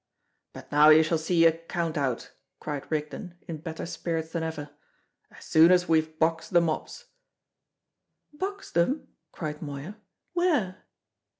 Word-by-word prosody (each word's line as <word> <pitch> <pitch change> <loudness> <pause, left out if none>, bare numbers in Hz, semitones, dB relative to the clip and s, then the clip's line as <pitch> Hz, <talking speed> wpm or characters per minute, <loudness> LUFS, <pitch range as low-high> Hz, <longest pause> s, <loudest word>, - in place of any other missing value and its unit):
"And - - -9
now 150 +1 +7
you 155 +1 +8
shall 160 +1 0
see 165 +1 +3
a 165 - +8
count 165 0 -4
out," 135 -5 -2 0.3
cried 145 -2 -5
Rigden, 160 +4 -4
in 165 - -5
better 160 +1 -6
spirits 165 -1 -3
than 165 - -2
ever, 155 -2 -5 0.6
"as - - -15
soon 160 +2 +6
as 180 0 +4
we've 160 -1 +1
boxed 165 +2 0
the 175 - +7
mobs." 170 - -3 1.3
"Boxed 390 +6 -5
them!" 265 - +1 0.2
cried 150 -2 -5
Moya. 145 +7 -7 0.4
"Where?" 300 - 0
165 Hz, 140 wpm, -27 LUFS, 155-180 Hz, 1.3 s, you